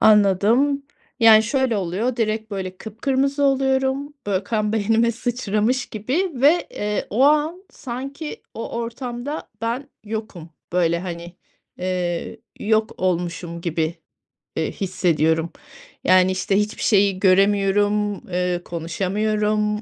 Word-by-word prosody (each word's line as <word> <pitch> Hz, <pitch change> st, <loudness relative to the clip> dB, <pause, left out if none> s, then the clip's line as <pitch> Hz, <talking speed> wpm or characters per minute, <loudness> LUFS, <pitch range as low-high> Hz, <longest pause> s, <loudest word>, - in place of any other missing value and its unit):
Anladım, 215 Hz, +7 st, +4 dB, 0.4 s
yani, 220 Hz, -1 st, +8 dB
şöyle 255 Hz, 0 st, +1 dB
oluyor, 200 Hz, +7 st, -1 dB
direkt, 220 Hz, -1 st, -1 dB
böyle, 190 Hz, -2 st, -4 dB
kıpkırmızı 270 Hz, +7 st, -1 dB
oluyorum. 270 Hz, +1 st, +1 dB
Böyle, 195 Hz, -1 st, 0 dB
kan 215 Hz, 0 st, -1 dB
beynime 225 Hz, +2 st, +2 dB
sıçramış 240 Hz, 0 st, -1 dB
gibi 265 Hz, -, -1 dB
ve, 290 Hz, +7 st, +4 dB
eee, 210 Hz, 0 st, -2 dB
o 225 Hz, +6 st, +2 dB
an 305 Hz, +5 st, +2 dB
sanki 275 Hz, +4 st, -6 dB
o 230 Hz, -, -5 dB
ortamda 240 Hz, +4 st, -5 dB
ben 235 Hz, +5 st, -2 dB, 0.2 s
yokum. 210 Hz, -6 st, -6 dB, 0.2 s
Böyle, 170 Hz, -1 st, +2 dB
hani, 175 Hz, -1 st, -7 dB, 0.4 s
eee, 180 Hz, -2 st, -2 dB, 0.2 s
yok 220 Hz, +1 st, +1 dB
olmuşum 175 Hz, -1 st, -2 dB
gibi, 165 Hz, -1 st, -1 dB, 0.6 s
eee, 160 Hz, -, -1 dB
hissediyorum. 165 Hz, -3 st, +1 dB, 0.5 s
Yani, 185 Hz, 0 st, +5 dB
işte, 185 Hz, +1 st, 0 dB
hiçbir 210 Hz, +1 st, -2 dB
şeyi 200 Hz, -3 st, +3 dB
göremiyorum, 205 Hz, +2 st, +3 dB, 0.2 s
eee, 180 Hz, -1 st, -1 dB
konuşamıyorum, 210 Hz, +5 st, -1 dB
210 Hz, 110 wpm, -22 LUFS, 185-245 Hz, 0.6 s, yani